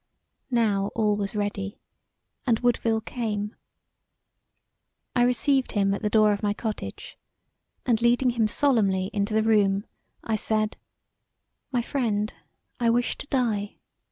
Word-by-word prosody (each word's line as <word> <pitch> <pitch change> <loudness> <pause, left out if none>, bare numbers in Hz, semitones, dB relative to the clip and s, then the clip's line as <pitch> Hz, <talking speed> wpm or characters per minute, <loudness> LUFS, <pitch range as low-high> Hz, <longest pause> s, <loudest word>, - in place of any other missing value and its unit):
Now 215 -5 +2
all 215 -2 +2
was 200 0 -3
ready 205 -1 -3 0.7
and 230 -2 +3
Woodville 230 -2 +2
came. 215 -3 -3 1.6
I 245 - +3
received 255 +2 +2
him 195 -1 +2
at 200 - -3
the 210 - 0
door 215 -1 +5
of 200 - -4
my 205 -1 0
cottage 220 -2 -6 0.7
and 235 -2 +2
leading 240 +2 +3
him 230 -2 +1
solemnly 210 -7 +2
into 205 0 0
the 220 - +3
room, 205 -2 +3 0.4
I 220 -1 0
said: 215 0 0 1.0
"My 245 -2 +1
friend, 220 -5 -1 0.5
I 235 -1 +3
wish 240 +1 +1
to - - -7
die. 220 -7 0
220 Hz, 130 wpm, -26 LUFS, 205-240 Hz, 1.6 s, door